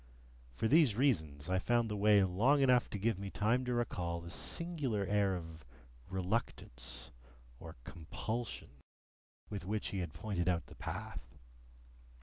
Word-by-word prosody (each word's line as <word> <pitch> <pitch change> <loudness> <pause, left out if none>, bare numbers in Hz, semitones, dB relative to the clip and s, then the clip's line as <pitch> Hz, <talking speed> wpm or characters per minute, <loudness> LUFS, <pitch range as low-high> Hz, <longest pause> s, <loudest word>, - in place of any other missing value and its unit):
For 110 - +1
these 145 -5 +5
reasons, 80 - +1
I 95 0 +2
found 120 +3 +2
the 105 - -3
way 105 0 +5
long 115 +11 +3
enough 125 -2 +4
to - - -3
give 105 0 0
me 100 0 -4
time 115 +6 +1
to 125 - 0
recall 85 -8 -2
a 85 - -7
singular 140 - -1
air 100 -1 +2
of 80 -3 -8 0.5
reluctance 90 - -3 0.5
or 80 -1 -9
compulsion 110 - -5 0.7
with 100 -4 -4
which 105 +3 -2
he 100 - -3
had 85 -4 -3
pointed 90 +1 -1
out 85 -2 0
the - - -14
path. - - -6
100 Hz, 145 wpm, -35 LUFS, 85-115 Hz, 0.7 s, these